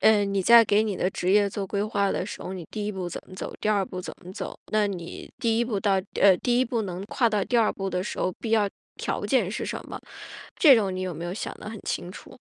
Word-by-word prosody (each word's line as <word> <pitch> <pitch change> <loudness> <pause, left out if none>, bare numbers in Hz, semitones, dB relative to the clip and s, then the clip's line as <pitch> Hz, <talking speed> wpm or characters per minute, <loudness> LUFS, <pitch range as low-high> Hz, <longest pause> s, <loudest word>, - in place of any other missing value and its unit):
嗯， 205 -2 +4
你 195 -1 +1
在 235 +3 +8
给 210 0 +3
你 210 -3 -1
的 185 - 0
职 185 -1 -1
业 205 0 +5
做 195 0 -4
规 200 +1 -1
划 200 -2 +1
的 180 - -1
时 - - -7
候， 185 - -5
你 180 -4 -7
第 210 -2 -4
一 210 - -2
步 185 -2 -4
怎 - - -5
么 185 - -12
走， - - -5
第 - - -1
二 205 -2 +3
步 185 - -7
怎 180 - -7
么 180 - -10
走， - - -6 0.2
那 215 -1 +3
你 175 -4 -6
第 225 -1 +1
一 235 - +2
步 210 -5 -2
到 200 -2 +2 0.3
呃， 190 -2 +7
第 245 0 +3
一 - - +4
步 235 -2 -1
能 185 -1 -5
跨 235 -1 +1
到 210 -2 +1
第 245 - 0
二 225 -2 +4
步 195 -1 -4
的 180 0 -2
时 - - -5
候， 185 - +1
必 225 - -4
要 215 -3 +3 0.3
条 - - -3
件 - - +2
是 - - -3
什 - - -4
么？ - - -6 0.6
这 290 -7 +8
种 195 -5 +1
你 185 - -3
有 185 -1 -3
没 165 +2 -5
有 175 - -4
想 - - -4
得 - - -7
很 220 -1 -7
清 175 - -3
楚？ - - -12
200 Hz, 305 characters per minute, -26 LUFS, 185-220 Hz, 0.6 s, 在